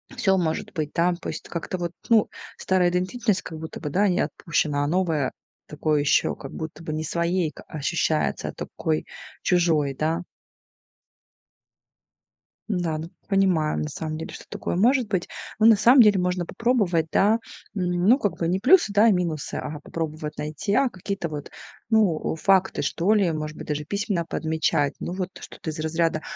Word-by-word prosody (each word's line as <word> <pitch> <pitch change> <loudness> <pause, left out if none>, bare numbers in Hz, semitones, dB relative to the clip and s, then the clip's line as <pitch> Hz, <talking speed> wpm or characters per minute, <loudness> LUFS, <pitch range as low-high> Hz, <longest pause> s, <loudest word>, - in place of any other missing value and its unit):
всё 190 -1 +2
может 160 -3 -1
быть 155 -3 -3
там. 175 +1 +2
То 170 - -8
есть - - -6
как-то 170 +2 -4
вот, 175 -1 -3 0.2
ну, 225 -3 +5 0.3
старая 185 -2 +2
идентичность 185 +4 0
как 160 - -8
будто 160 0 -7
бы, 150 - -3
да, 200 +8 +2
не 180 -2 +1
отпущена, 150 -3 0
а 145 - 0
новая 160 -5 +1 0.4
такой 150 0 0
ещё 145 - +2
как 135 - -9
будто 160 +1 -7
бы 155 - -4
не 155 +1 -2
своей 170 +1 0
ка - - -13
ощущается, 155 +1 -1
а - - -7
такой 80 0 -3 0.4
чужой, 160 -6 +2
да. 160 +4 0 2.5
Да, 175 -6 -1
ну, 160 +1 -5
т - - -36
понимаем, 185 -6 +2
на 150 - -3
самом 155 +1 -4
деле, 160 - -6
что - - -10
такое - - -3
может 245 +4 +3
быть. 185 -4 -1 0.3
Ну, 215 - +4
на 225 -1 +8
самом 240 +6 +7
деле, 210 -4 +5
можно 180 -1 0
попробовать, 200 -9 +1
да, 215 +3 +4 0.3
ну, 180 +4 +3
как 205 -8 -1
бы 165 - -1
не 180 +3 +1
плюсы, 255 - +5
да, 205 +2 +5
а 230 - +6
минусы, 170 -5 -1
а, 150 0 -4
попробовать 155 -1 -5
найти, 150 +7 -3
а 270 +4 +4
какие-то 195 -2 -4
вот, 150 -2 -6 0.4
ну, 205 -10 +2
факты, 190 +3 +2
что 185 +6 +1
ли, 200 -4 +3
может 155 -1 -4
быть, - - -8
даже 150 0 -2
письменно 200 -1 -1
подмечать. 160 -3 0
Ну, - - -3
вот 185 -1 -3
что-то 160 - -7
из 155 - -8
разряда: 160 0 0
170 Hz, 180 wpm, -24 LUFS, 155-195 Hz, 2.5 s, на